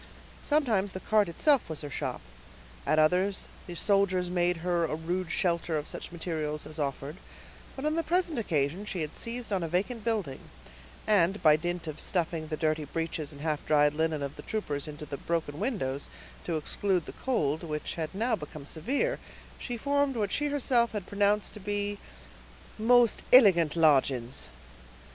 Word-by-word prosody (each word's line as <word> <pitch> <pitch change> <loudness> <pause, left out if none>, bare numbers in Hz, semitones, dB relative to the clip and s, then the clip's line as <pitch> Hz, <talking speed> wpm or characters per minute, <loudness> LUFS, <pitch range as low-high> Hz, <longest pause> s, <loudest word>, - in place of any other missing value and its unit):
Sometimes 225 -10 +1
the 185 - -4
cart 210 -1 +2
itself 270 - +3
was 160 - -5
her 145 - -5
shop; - - -3 0.7
at 155 - +3
others 180 +6 +2 0.2
the 175 - -6
soldiers 185 -2 +2
made 175 -1 +2
her 175 -1 +2
a 155 -1 0
rude 175 +2 -2
shelter 170 -2 0
of 150 - -4
such - - -6
materials 155 -3 -3
as 155 +1 -7
offered; 140 +2 -3 0.6
but 270 - -5
on 305 - +2
the 330 - +2
present 335 -4 +1
occasion 160 -2 0
she 190 -4 -4
had 155 0 -4
seized 235 -2 -4
on 190 - +1
a 165 - -1
vacant 205 +7 -1
building, 205 - -1 0.7
and, 200 -1 +3
by 155 -1 +7
dint 175 +2 -3
of 155 -1 -6
stuffing 165 -3 -1
the 155 0 -3
dirty 155 0 0
breeches 160 0 -3
and 145 -1 -11
half 155 -1 -1
dried 150 -1 +4
linen 160 -1 0
of 140 0 -5
the - - -7
troopers 150 -11 -3
into 150 0 -7
the 140 -1 -5
broken 160 -2 -2
windows, 160 - -2 0.4
to 165 -2 0
exclude 180 +2 0
the - - -8
cold, 160 - 0
which 150 -2 -4
had 160 +2 -4
now 230 +4 +1
become 150 -1 -9
severe, 270 - -1 0.4
she 245 -2 -4
formed 285 +2 +1
what 205 -4 -1
she 295 - 0
herself 250 -5 +2
had 205 -4 -3
pronounced 205 +1 +1
to - - -9
be 205 0 -2 0.8
"most 240 0 +5
illigant 185 - +7
lodgings." 135 -6 +2
175 Hz, 175 wpm, -29 LUFS, 155-210 Hz, 0.8 s, by